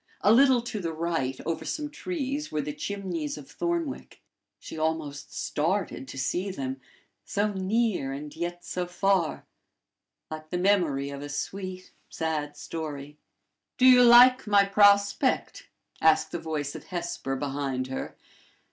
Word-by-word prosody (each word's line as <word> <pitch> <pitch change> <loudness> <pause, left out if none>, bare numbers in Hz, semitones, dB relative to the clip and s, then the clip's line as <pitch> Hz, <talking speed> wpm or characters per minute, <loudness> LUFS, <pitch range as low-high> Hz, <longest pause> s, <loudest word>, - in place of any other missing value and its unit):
A 210 - +5
little 260 -1 +5
to 225 -3 -4
the 165 -4 -3
right, 160 -5 -2
over 165 - -2
some 300 -1 -3
trees, 295 -2 -4
were 150 -1 -1
the 150 +1 -4
chimneys 175 -3 -4
of 145 -2 -10
Thornwick. 340 -4 -3 0.4
She - - -9
almost 155 -3 -3
started 165 -3 -2
to 135 - -9
see 175 +9 -1
them 135 -6 -5 0.4
so 205 +1 -1
near, 190 - 0
and 145 +2 -7
yet 175 +1 -5
so 180 -1 -3
far 180 -1 0 0.9
like 155 0 -7
the 180 - -2
memory 175 -8 +1
of 140 0 -7
a 145 - -7
sweet, 185 +5 -5 0.2
sad 150 -2 -3
story. 150 -2 -6 0.6
"Do 255 - +4
you 250 -1 +8
like 245 +1 +7
my 200 -1 +5
prospect?" 200 +5 +3 0.3
asked 160 -1 +4
the 175 - -3
voice 150 -3 -3
of - - -9
Hesper 170 -7 -4
behind 135 -2 -2
her. 130 - -5
170 Hz, 145 wpm, -27 LUFS, 145-205 Hz, 0.9 s, you